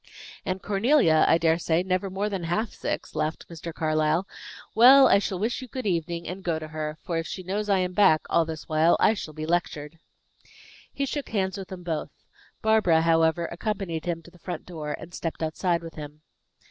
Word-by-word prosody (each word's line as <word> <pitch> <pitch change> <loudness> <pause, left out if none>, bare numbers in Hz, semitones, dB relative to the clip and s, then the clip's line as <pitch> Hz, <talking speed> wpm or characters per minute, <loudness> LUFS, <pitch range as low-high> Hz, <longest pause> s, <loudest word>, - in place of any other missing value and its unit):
"And 185 0 -2
Cornelia, 200 - +3
I 165 - +5
dare 165 0 +2
say, 165 +1 +1
never 185 +1 -1
more 195 +2 -2
than 195 -5 -3
half 210 +7 -1
six," - - -4
laughed 155 +1 -3
Mr. 170 0 -7
Carlyle. 155 +3 0 0.5
"Well, 260 +4 +8
I - - +5
shall 195 -2 -3
wish 225 +7 -2
you 255 - -8
good 255 0 -6
evening, 170 -2 -2
and 185 +2 -6
go 170 -3 0
to 155 0 -7
her; 155 0 -4
for 170 -3 -2
if 165 - -4
she 185 - -6
knows 205 +3 -3
I 200 - +4
am 180 -1 -1
back 180 -5 +5
all 170 - +3
this 160 -1 -7
while, 160 +2 +3
I 220 - +5
shall 155 -7 -7
be 155 0 -4
lectured." 165 -2 -2 0.9
He 280 - -2
shook 285 +1 -4
hands 190 -3 -1
with 195 -2 -7
them 185 -2 -9
both. 165 -3 -3 0.5
Barbara, 215 -7 +4
however, 165 +1 +3
accompanied 185 -3 -3
him 170 -1 -3
to 170 - -15
the 175 - -19
front 180 - -6
door, 155 -4 -5
and 170 +2 -11
stepped 165 -1 -4
outside 170 +2 0
with 165 -1 -8
him. 150 0 -10
175 Hz, 205 wpm, -26 LUFS, 160-195 Hz, 0.9 s, Well